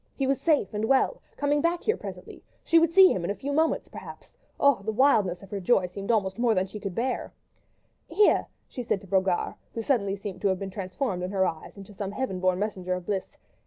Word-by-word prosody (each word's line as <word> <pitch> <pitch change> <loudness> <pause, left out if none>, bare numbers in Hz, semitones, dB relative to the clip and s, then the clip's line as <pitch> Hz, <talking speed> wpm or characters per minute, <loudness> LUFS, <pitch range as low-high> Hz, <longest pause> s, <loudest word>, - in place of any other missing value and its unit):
He 275 - -1
was 270 0 0
safe 295 - +2
and 210 +1 -1
well, 270 - +2
was - - -34
coming 290 0 +1
back 340 +2 0
here 440 - +2
presently, - - -9 0.2
she 330 - +5
would 330 0 +3
see 380 +1 +8
him 180 - -3
in 170 - -2
a 200 - -1
few 280 +8 -4
moments 320 +2 +1
perhaps.... - - -11 0.3
Oh! 280 -7 +4
the 220 +2 -2
wildness 210 -7 +2
of 195 - -14
her 200 - -3
joy 190 0 +3
seemed 195 +3 -7
almost 205 -2 +1
more 235 -2 +3
than 185 0 +2
she 210 +2 -8
could 195 -3 -5
bear. 255 +2 -2 0.7
"Here!" 420 - +3 0.2
she 250 - -6
said 235 -4 -1
to 195 - -14
Brogard, 190 -1 +1 0.2
who 230 - -2
seemed 250 -2 +2
suddenly 200 0 -3
to 200 0 -3
have 190 -1 +1
been 195 0 -6
transformed 185 +1 -3
in 180 - -3
her 190 -1 +1
eyes 160 +3 -5
into 200 +1 -11
some 200 0 -5
heaven 230 -6 -3
born 185 0 +2
messenger 185 -3 -2
of 180 -1 -7
bliss. 195 -1 -3
205 Hz, 235 wpm, -27 LUFS, 190-265 Hz, 0.7 s, see